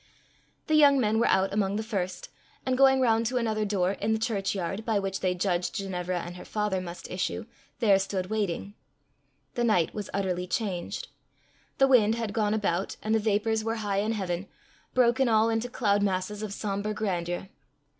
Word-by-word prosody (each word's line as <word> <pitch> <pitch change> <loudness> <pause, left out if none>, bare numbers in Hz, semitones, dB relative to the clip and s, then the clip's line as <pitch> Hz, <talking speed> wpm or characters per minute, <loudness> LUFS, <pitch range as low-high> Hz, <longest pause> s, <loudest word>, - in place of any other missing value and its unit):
The 310 - -1
young 285 -3 +6
men 220 -2 +2
were 235 - +3
out 190 +1 +2
among 200 -1 +1
the 220 - -1
first, 205 - -3 0.4
and 260 -1 +1
going 265 0 +5
round 230 -2 +3
to 250 +2 -1
another 220 -3 0
door, 190 -3 +1
in 210 +2 -1
the - - +1
church 215 -4 -1
yard, 195 +3 -3
by 220 -2 +1
which 195 -1 -2
they 185 -1 0
judged 180 -1 -1
Ginevra 180 -2 -2
and 175 +1 -8
her - - -9
father 210 -3 -1
must 175 -1 -8
issue, 185 +4 -2 0.3
there 205 -5 +4
stood 190 -1 -2
waiting. 200 -2 -2 0.8
The 240 - -1
night 210 -8 +2
was 210 -2 -5
utterly 180 -2 -1
changed. 185 -4 -3 0.7
The 270 - +5
wind 225 -4 +5
had 225 -3 -3
gone 215 -1 +1
about, 195 -3 -1
and 215 - 0
the 225 - +4
vapours 220 +1 +1
were 225 +1 -1
high 200 -1 +1
in 215 +2 0
heaven, 190 -2 -3 0.5
broken 250 +1 +4
all 220 0 +4
into 225 +2 -1
cloud 205 -5 +1
masses 200 +1 -1
of 215 -2 -4
sombre 205 +1 -3
grandeur. 175 -3 -2
210 Hz, 185 wpm, -28 LUFS, 190-225 Hz, 0.8 s, young